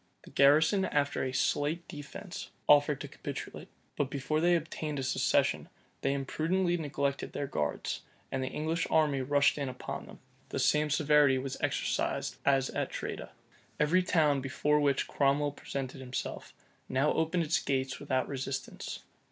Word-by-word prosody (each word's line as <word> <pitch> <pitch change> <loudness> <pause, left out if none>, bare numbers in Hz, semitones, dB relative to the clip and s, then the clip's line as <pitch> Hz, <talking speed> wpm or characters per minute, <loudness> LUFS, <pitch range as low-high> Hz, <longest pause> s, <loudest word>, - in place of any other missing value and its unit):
The - - -14
garrison, 155 +8 +5
after 145 -4 0
a 130 - -1
slight 150 +5 0
defence, 150 +5 -8 0.2
offered 145 -1 +5
to - - -5
capitulate; - - -7 0.3
but 140 - 0
before 140 +3 -1
they 175 +1 +5
obtained 155 -2 -3
a 135 - -2
cessation, 130 - +1 0.3
they 135 - +1
imprudently 165 +6 0
neglected 140 -3 -2
their 145 - -2
guards; - - -2 0.3
and 135 - -1
the - - -2
English 160 +4 -1
army 150 -4 +3
rushed 145 +2 +3
in 140 -2 -1
upon 130 - -6
them. - - -12 0.3
The - - -3
same 150 0 +3
severity 150 -2 +4
was 135 0 -4
exercised - - -1
as 135 -1 +3
at - - -2
Tredah. - - -5 0.5
Every 160 +5 +4
town 155 -6 +2
before 150 +3 +1
which 140 -2 +2
Cromwell 145 +1 +2
presented 135 -1 -5
himself, 125 -1 -5 0.4
now 135 +3 +2
opened 165 +2 +1
its 160 +1 +1
gates 130 -1 -1
without 130 -1 0
resistance. 135 -1 -5
145 Hz, 150 wpm, -31 LUFS, 135-155 Hz, 0.5 s, garrison